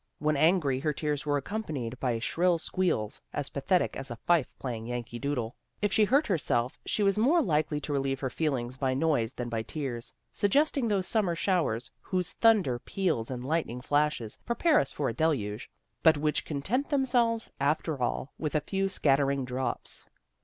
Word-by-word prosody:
When 150 +1 +1
angry 155 -3 +3
her 150 +2 0
tears 150 0 -2
were 145 0 +2
accompanied 140 - -4
by 125 -3 0
shrill 170 +9 +1
squeals, 165 - -1
as 140 - 0
pathetic 180 +6 +1
as 135 0 -5
a 120 - -4
fife 165 +3 +2
playing 115 -3 -5
Yankee 120 -1 -5
Doodle. 130 -4 -2 0.2
If 205 -1 0
she 215 - +5
hurt 275 +8 +3
herself 135 - 0
she 210 - +1
was 200 +1 +3
more 285 +10 +4
likely 155 - +1
to 145 - -3
relieve 135 -1 0
her 130 -2 -2
feelings 130 -5 -1
by 130 -1 0
noise 135 -6 +1
than 120 - -4
by 115 -1 -2
tears, 120 -2 -5 0.2
suggesting 275 +4 +2
those 200 -4 +1
summer 195 -6 +1
showers 165 - 0
whose 180 -2 -2
thunder 200 - +3
peals 160 -9 -1
and 125 -1 -5
lightning 150 -5 -1
flashes 145 -4 0
prepare 300 +6 +3
us - - +1
for - - -2
a - - -1
deluge, 120 -10 -1 0.3
but 160 -2 +6
which 150 +1 0
content 195 - -1
themselves, 245 -5 +2
after 145 0 0
all, 130 +3 -2
with 155 -1 -2
a 150 - +3
few 195 +3 -1
scattering 140 -5 +2
drops. 125 -1 -3
150 Hz, 175 wpm, -29 LUFS, 130-185 Hz, 0.3 s, but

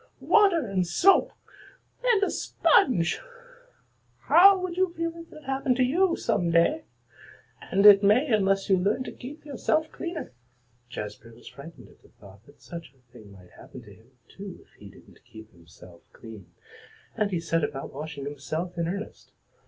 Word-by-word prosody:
Water 390 - +3
and 190 -4 -1
soap! 365 - +3 0.7
And 470 -5 +2
a - - 0
sponge! 245 - +1 1.0
How 390 +3 +6
would 365 -2 -5
you 370 -1 0
feel 335 0 -2
if 335 0 -12
that 305 - -14
happened 270 -1 -1
to 255 - +2
you 340 +8 +2
some 180 -7 -1
day? 170 - +2 0.9
And 200 +2 +2
it 200 -1 +9
may 210 +8 +3
unless 195 -2 +1
you 190 - +3
learn 205 +8 0
to - - -8
keep 290 +5 -11
yourself 310 +3 -1
cleaner." 340 -2 -6 0.6
Jazbury 105 0 -9
was 120 - -17
frightened 140 -6 -13
at - - -23
the - - -22
thought 100 +1 -18
that 145 - -21
such 170 -4 -10
a 125 -2 -34
thing 110 -5 -15
might 90 -2 -17
happen - - -13
to - - -15
him, 115 +2 -22 0.2
too, 195 -2 -10
if - - -32
he 100 - -12
didn't - - -20
keep 110 0 -15
himself 85 0 -18
clean, 110 -5 -13 0.6
and 210 -1 0
he 180 -4 -2
set 165 -1 -1
about 135 -1 -5
washing 145 0 -7
himself 155 +5 -5
in 165 - -1
earnest. 200 +4 -7
190 Hz, 170 wpm, -26 LUFS, -, 1.0 s, it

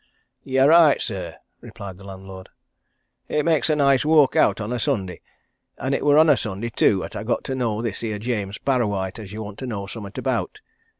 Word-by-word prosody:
"You're 135 +1 +3
right, 165 -3 +6
sir," 90 -7 -5 0.2
replied 95 -2 -10
the - - -13
landlord. 95 -1 -10 0.8
"It 150 - -1
makes 160 -2 +2
a 155 - +3
nice 140 -3 +3
walk 150 -3 +4
out - - +3
on 110 +3 -3
a 125 - -2
Sunday. 105 -9 -2 0.6
And 130 - -2
it - - -1
were 145 0 +4
on 160 +1 +6
a 150 - +6
Sunday, 110 0 -4
too, 100 -3 +2
'at - - -8
I - - -4
got - - -1
to 135 - -4
know 115 -3 -2
this 110 -5 -3
here 110 -2 -3
James 105 -3 -3
Parrawhite 105 -8 -1
as 100 -3 -9
you 110 +1 -6
want 105 -1 -9
to 130 - -5
know 100 -5 -4
summat 100 0 -8
about. 115 -8 -2
115 Hz, 205 wpm, -22 LUFS, 100-135 Hz, 0.8 s, right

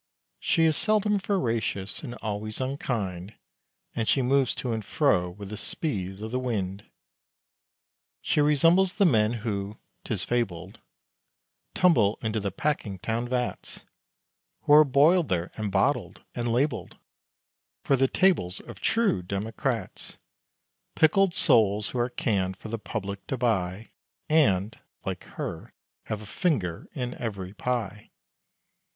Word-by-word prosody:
She 165 -3 +2
is 160 -1 +3
seldom 210 +1 +2
veracious, 115 - -1
and 125 -6 -7
always 110 0 -3
unkind, 110 -8 -3 0.6
And 115 -2 -1
she 135 - +3
moves 135 0 +2
to 125 -3 -2
and 110 -1 -3
fro 100 - +2
with 100 +2 -9
the 105 - -6
speed 100 - -3
of 110 - -5
the 125 - 0
wind. 100 -6 -3 1.3
She 150 - +1
resembles 165 +6 +4
the 200 - +4
men 110 -8 +3
who 100 -1 -3 0.3
('tis 105 -4 -2
fabled) 95 -7 -2 1.0
Tumble 115 - +4
into 110 0 -1
the 100 -1 -3
Packingtown 115 -1 -2
vats, 125 -1 -3 0.8
Who 145 - +4
are 150 +1 +10
boiled 150 +5 +4
there, 90 -1 -1
and 105 -2 -3
bottled, 100 -3 0
and 120 -1 -2
labelled 125 +1 -1 0.9
For 140 - +3
the 135 0 +3
tables 150 - +2
of - - -11
true 225 - +2
democrats: 105 +4 -4 0.8
Pickled 175 +3 +4
souls 105 - +4
who 125 - -3
are 120 +1 +1
canned 95 -6 -1
for 110 - -9
the 115 0 -3
public 100 -2 -5
to 135 - -2
buy, 105 -4 -1 0.4
And 110 - +2 0.3
(like - - -4
her) - - -6 0.3
have 110 -1 -4
a - - -10
finger 100 - -1
in 125 -1 -3
every 100 -5 -4
pie! 105 -3 -3
115 Hz, 135 wpm, -27 LUFS, 100-140 Hz, 1.3 s, are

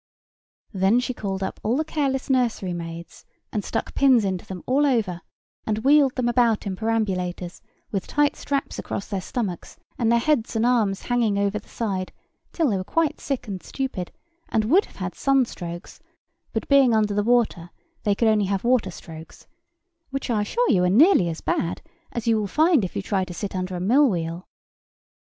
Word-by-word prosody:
Then 195 +5 +3
she 255 0 -2
called 195 -4 -4
up 190 - -4
all 230 +4 0
the 315 - 0
careless 275 -4 -1
nurserymaids, 175 -10 -2 0.3
and 210 - -2
stuck - - -3
pins 260 -6 +4
into 190 +1 -3
them 185 -2 -7
all 275 +3 +2
over, 220 -11 +1 0.5
and 215 -1 0
wheeled 280 -1 +5
them 250 -2 0
about 240 -3 +2
in 195 -2 -3
perambulators 185 -5 -2 0.3
with 195 -3 -3
tight 295 -1 +2
straps 280 -1 -3
across 200 - -4
their 195 -2 -3
stomachs 200 -5 -4 0.2
and 230 -2 +2
their 235 - +5
heads 240 -2 +1
and 225 +1 +2
arms 220 -6 +1
hanging 235 -4 +1
over 200 +1 0
the - - -21
side, 195 -5 -3 0.4
till 320 -8 +1
they 200 - +1
were 185 - -3
quite 330 - 0
sick 265 -4 -3
and 190 -3 -5
stupid, 255 -10 -4 0.4
and 215 -1 +1
would 350 - +4
have - - -20
had 185 -1 -4
sun 270 -2 +2
strokes: 175 -4 -8 0.5
but, - - -3
being 270 -5 +5
under 210 -1 +2
the 205 - +1
water, 220 -7 +1 0.3
they 205 -2 +1
could 230 - +2
only 215 -2 +3
have 195 0 -1
water 240 -5 +2
strokes; 165 -2 -11 0.6
which, 275 -2 -3
I 215 -2 +1
assure 475 - +1
you, 180 -4 +3
are 180 - +3
nearly 230 - +5
as 160 - -5
bad, 170 - -1 0.3
as 235 - -4
you 230 -1 +3
will 210 - -2
find 310 - +3
if 185 - -4
you - - -2
try 195 -1 0
to 180 -1 -7
sit 195 +2 -5
under 185 0 -3
a - - -3
mill 255 +10 +4
wheel. 170 -1 -3
215 Hz, 190 wpm, -24 LUFS, 185-255 Hz, 0.6 s, wheeled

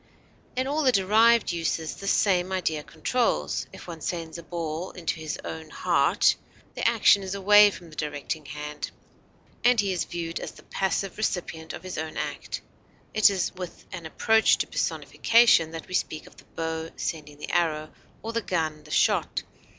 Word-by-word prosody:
In 255 +1 0
all 290 +3 0
the 265 -4 +4
derived 220 +2 +4
uses 165 -1 -2
this 195 - -4
same 185 -3 +2
idea 165 -5 -1
controls; 230 +11 -1
if - - -11
one 165 -2 -7
sends 165 0 -4
a - - -7
ball 165 +1 -4
into 165 -2 -3
his 155 -1 -4
own 80 -1 -6
heart, - - +3 0.4
the - - 0
action 200 - +5
is 190 0 -4
away 205 +1 +7
from 175 -4 -11
the - - -12
directing 150 0 -4
hand, 150 +1 -5 0.7
and 245 -1 +5
he 200 -2 +2
is 180 - -1
viewed 170 -1 -4
as - - -6
the - - -16
passive 190 0 -2
recipient 170 -6 -3
of - - -8
his 185 -3 -5
own 155 0 -5
act; - - -4 0.5
it 215 -1 +6
is 190 -3 -1
with 180 -1 -8
an 170 -3 -6
approach 220 +7 +4
to - - 0
personification 230 -8 +3
that 165 0 -8
we - - -9
speak 155 -4 -1
of - - -16
the - - -16
bow 160 0 -3
sending 150 -2 -4
the 150 - -6
arrow, 155 -3 0 0.3
or 225 +1 -4
the 230 - 0
gun 160 -6 -1
the 150 - -15
shot. - - +2
175 Hz, 180 wpm, -26 LUFS, 160-200 Hz, 0.7 s, away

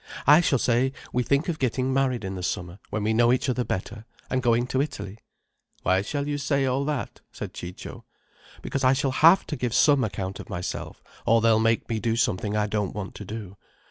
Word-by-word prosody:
I 150 +4 +7
shall 145 -5 +2
say 125 +2 +1 0.2
we 125 - +2
think 140 +5 +1
of 165 -3 -2
getting 130 +1 0
married 130 -4 +1
in 95 - -4
the 95 - -5
summer, 90 +1 -4
when 110 - -2
we 110 +1 +1
know 120 +1 +4
each 130 +2 +1
other 125 0 0
better, 110 0 -5 0.3
and 130 - +1
going 120 0 +2
to 130 +1 0
Italy." 105 -8 -5 0.6
"Why 95 +1 +3
shall 140 +7 -3
you 145 0 -2
say 140 -1 +1
all 135 +2 0
that?" 150 -3 -3
said - - -7
Ciccio. 90 +1 -8 0.6
"Because 140 - -3
I 130 +1 +5
shall 135 0 0
have 165 +7 +5
to 150 - -4
give 125 -3 -2
some 145 -4 +5
account 95 -3 -4
of - - -9
myself, 90 +1 -5 0.2
or 115 +1 +4
they'll 115 -1 +4
make 115 0 +1
me 115 -1 -2
do 115 0 0
something 105 -2 0
I 105 - +2
don't 105 -2 -2
want 105 -3 -5
to 105 - -9
do. 100 -1 -7
120 Hz, 215 wpm, -25 LUFS, 105-135 Hz, 0.6 s, I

